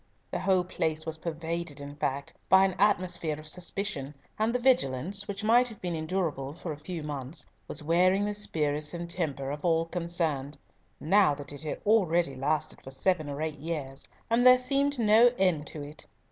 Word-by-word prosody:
The - - -2
whole 190 -2 +3
place 160 -3 -2
was 160 -1 -3
pervaded, 165 -2 -4
in 145 0 -8
fact, 140 -1 -2 0.2
by 190 0 +7
an 190 - 0
atmosphere 180 -6 +1
of 155 - -11
suspicion, 170 -4 -4 0.2
and 220 +2 +2
the 250 - +1
vigilance, 200 - +1
which 200 +1 -5
might 240 +3 +5
have 220 -4 -10
been 175 -2 -3
endurable 155 -4 -2
for 175 -1 -6
a 150 - -7
few 165 +1 -6
months, 145 0 -5 0.2
was 155 - -3
wearing 185 +5 +3
the 210 - -1
spirits 150 -6 -1
and 170 0 -5
temper 145 -6 -2
of 150 +1 -6
all 165 -1 +2
concerned, 165 -5 -2 0.4
now 175 -2 +4
that 145 0 -7
it 145 - -6
had 155 - -4
already 175 -9 +3
lasted 150 +3 -1
for - - -10
seven 155 +3 0
or 145 +2 -3
eight 155 -2 -4
years, 145 -4 -5 0.2
and 235 +1 +2
there 255 0 +9
seemed 275 +2 +1
no 230 +1 +6
end 175 -6 +2
to 150 - -7
it. 145 +1 -10
165 Hz, 190 wpm, -29 LUFS, 150-195 Hz, 0.4 s, there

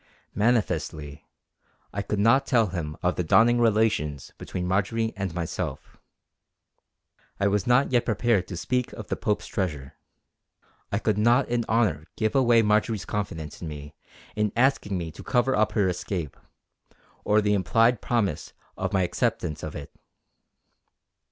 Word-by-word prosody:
Manifestly, 85 -9 -1 0.7
I 100 - -2
could 105 - -3
not 115 +7 +4
tell 115 -4 +4
him 80 -4 -5
of 90 0 +1
the 90 - 0
dawning 115 +8 +4
relations 105 - +1
between 90 - -4
Marjory 110 +4 0
and 100 -3 -3
myself. 85 -2 -5 1.4
I 100 - +1
was 100 +1 0
not 125 +3 +3
yet 120 -2 +3
prepared 110 -4 +1
to 90 - -6
speak 125 +7 -1
of 110 - -9
the - - 0
Pope's 105 - -1
treasure. 75 -10 -3 1.0
I 100 - +1
could 110 -1 0
not 120 +5 +4
in 120 -1 0
honour 105 -10 +1
give 110 -1 0
away 120 -4 +4
Marjory's 105 0 +1
confidence 80 -7 -5
in 85 - -5
me 75 -1 -8 0.4
in 105 -1 0
asking 120 -6 +2
me 85 -2 -4
to - - -11
cover 130 +2 +1
up 110 0 +1
her 100 -4 +2
escape, 90 -4 -3 0.9
or 105 +1 +3
the 105 -1 +2
implied 115 +4 +2
promise 100 -10 -1 0.2
of 95 +2 -3
my 95 -1 +3
acceptance 80 -3 -1
of 80 - -6
it. 70 - -8
105 Hz, 150 wpm, -26 LUFS, 90-115 Hz, 1.4 s, not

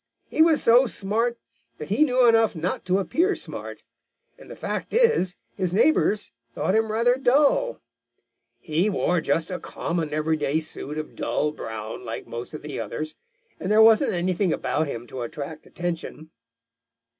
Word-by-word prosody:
He - - 0
was 320 -2 +4
so 245 +3 +6
smart 225 +4 -1 0.4
that 150 - -8
he 215 +10 +4
knew 255 -4 +4
enough 225 -3 +4
not 170 +3 -3
to 185 +1 +2
appear 340 - +1
smart, - - -7 0.5
and - - -16
the - - -8
fact - - -4
is 460 - +3 0.2
his 185 -2 -1
neighbors 215 -4 +2 0.2
thought 190 - 0
him 220 0 +2
rather 240 +3 +3
dull. 295 - +2 0.8
He 165 +6 0
wore 180 -3 +1
just 165 +3 0
a 180 - -3
common, 165 -3 -3
everyday 155 -1 0
suit 155 -1 -6
of 155 0 -6
dull 150 - -1
brown, 110 -6 -7
like - - -6
most 120 +5 -7
of - - -9
the 150 - -5
others, 155 0 -4 0.5
and 190 - -3
there 215 - +5
wasn't 220 0 +6
anything 180 +1 0
about 155 0 -1
him 120 -4 -5
to 125 +1 -7
attract 145 +6 -7
attention. 165 -2 -5
185 Hz, 160 wpm, -24 LUFS, 155-230 Hz, 0.8 s, so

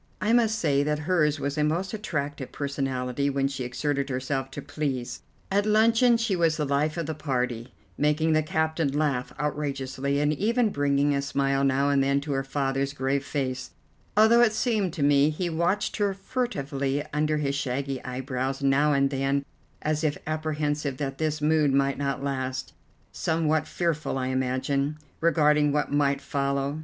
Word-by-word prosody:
I 210 +4 +1
must 225 -2 +3
say 145 -7 +2
that 150 +1 0
hers 155 -4 +2
was 140 +2 -2
a - - +3
most 170 +7 -1
attractive 145 -10 -4
personality 135 -1 -2
when 135 0 +1
she 135 -2 -4
exerted 140 +3 -2
herself 135 +1 -2
to 135 - -7
please. 135 -5 -3 0.3
At 205 +2 +2
luncheon 230 +3 +4
she 225 -4 0
was 165 -3 +2
the 150 - 0
life 145 +3 0
of 170 - -2
the 160 - -3
party, 125 -5 -2 0.3
making 150 +2 +2
the 155 - +4
captain 160 -2 0
laugh 140 -5 0
outrageously, 140 -1 -2
and 150 +1 +2
even 225 - +1
bringing 145 -3 +1
a 140 - +1
smile 140 0 0
now 140 +1 +2
and 140 -1 +3
then 140 +1 +2
to 145 +1 -5
her 135 -1 0
father's 135 0 -1
grave 135 0 -1
face, 130 -3 -3 0.5
although 220 +2 +6
it 230 -3 +4
seemed 215 -4 0
to 145 - -2
me 145 +1 +5
he 170 +3 -2
watched 170 +5 0
her 200 -2 +1
furtively 145 - -2
under 150 0 +1
his 140 -2 -1
shaggy 135 -1 -2
eyebrows 130 +1 -3
now 140 +2 +3
and 140 0 +2
then 135 +1 0 0.4
as 155 +1 0
if 150 -2 +1
apprehensive 150 -3 -2
that 135 -1 -4
this 155 -1 -1
mood 155 -2 +3
might 140 0 +1
not 140 -1 -2
last, 130 -1 -3 0.4
somewhat 155 -1 0
fearful, 165 -5 -1
I 130 0 -1
imagine, 130 +3 -1 0.2
regarding 150 -3 +3
what 150 +1 0
might 140 -1 +2
follow. 140 +1 -1
145 Hz, 170 wpm, -26 LUFS, 135-155 Hz, 0.5 s, although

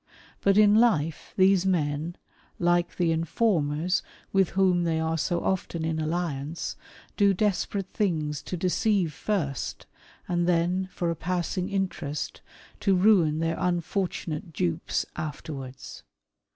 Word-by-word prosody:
But 200 0 +3
in 210 -1 +7
life 175 -9 +2
these 190 -1 +5
men, 160 -2 0 0.4
like 175 0 +1
the 170 -2 +2
informers 165 -1 +1 0.3
with 195 -3 +4
whom 185 -2 +4
they 165 -1 +1
are 160 0 0
so 170 +2 -1
often 170 -3 -1
in 160 -1 -1
alliance, 155 -1 -2 0.4
do 200 -2 +4
desperate 200 -1 -1
things 155 -7 0
to 180 - -5
deceive 185 -1 +1
first, 155 -8 -2 0.4
and 175 0 +1
then, 180 +2 +1
for 170 -1 -1
a - - -2
passing 180 +2 -2
interest, 185 -7 -3 0.4
to 195 -2 +3
ruin 180 -6 +4
their 165 +1 0
unfortunate 175 -2 -2
dupes 85 - -1
afterwards. 145 -3 -6
175 Hz, 125 wpm, -27 LUFS, 160-190 Hz, 0.4 s, in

